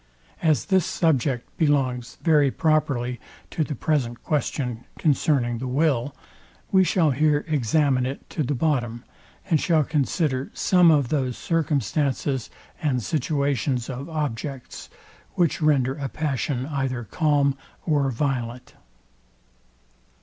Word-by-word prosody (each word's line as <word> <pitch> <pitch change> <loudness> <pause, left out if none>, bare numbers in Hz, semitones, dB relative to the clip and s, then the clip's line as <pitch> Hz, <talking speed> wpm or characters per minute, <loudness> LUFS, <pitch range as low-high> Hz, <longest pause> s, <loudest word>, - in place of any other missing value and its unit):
As 155 -3 +2
this 190 -3 +3
subject 140 -8 0
belongs 130 -6 +1
very 150 -4 +4
properly 130 -6 0 0.3
to 160 - 0
the 150 -1 -4
present 130 -7 -1
question 125 -5 -2
concerning 135 -5 +1
the 130 - -4
will, 140 -1 +1 0.6
we 190 -1 +5
shall 170 -4 +2
here 150 +2 +2
examine 140 -2 +2
it 135 - -7
to - - -2
the 145 0 0
bottom, 120 -5 -1 0.4
and 160 -6 +2
shall 160 -3 +3
consider 140 -2 0
some 180 -2 +4
of 145 -6 +3
those 130 -5 -1
circumstances 140 - -1 0.3
and 130 -6 0
situations 140 -3 -1
of 135 +5 -6
objects, 140 -4 -5 0.5
which 170 -2 +1
render 135 -4 +3
a 140 -1 -4
passion 135 -3 -2
either 135 -4 -2
calm 145 - +1 0.3
or 145 -4 +2
violent. 125 -2 -3
140 Hz, 120 wpm, -24 LUFS, 125-155 Hz, 0.6 s, we